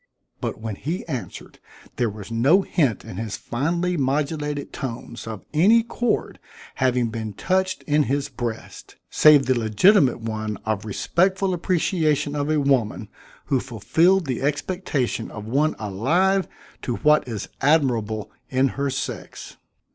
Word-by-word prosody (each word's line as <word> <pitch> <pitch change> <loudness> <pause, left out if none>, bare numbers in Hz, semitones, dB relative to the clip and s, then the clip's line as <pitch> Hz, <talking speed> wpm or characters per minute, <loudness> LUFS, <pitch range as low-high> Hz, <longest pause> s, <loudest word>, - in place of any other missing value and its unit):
But - - -4
when 110 -3 -5
he 165 +6 -4
answered, 130 -7 -7 0.4
there 120 -2 +1
was 105 +1 -9
no 140 +12 +4
hint 140 - 0
in 90 - -8
his 110 -1 -4
finely 170 +8 -1
modulated 145 +1 -1
tones 120 -2 -6
of 110 -3 -7
any 210 +9 +5
chord 235 0 -2 0.3
having 125 -2 +1
been 110 -1 -5
touched 185 - -1
in 150 0 +2
his 140 +1 0
breast, 120 -4 -6 0.2
save 150 -3 +6
the 130 - +3
legitimate 130 - +4
one 110 -2 -4
of 110 -1 -2
respectful 185 - +1
appreciation 165 -4 0
of 145 0 -1
a 155 -1 +2
woman 125 -6 0 0.4
who 135 -3 +1
fulfilled 160 - +2
the 130 -4 -3
expectation 145 - -1
of 105 -1 -8
one 145 +7 +1
alive 165 - +1 0.3
to 120 - -2
what 150 0 +3
is 110 -5 -5
admirable 120 -8 +1 0.2
in 130 +1 +2
her 140 +1 -2
sex. 135 0 -6
135 Hz, 140 wpm, -23 LUFS, 115-160 Hz, 0.4 s, save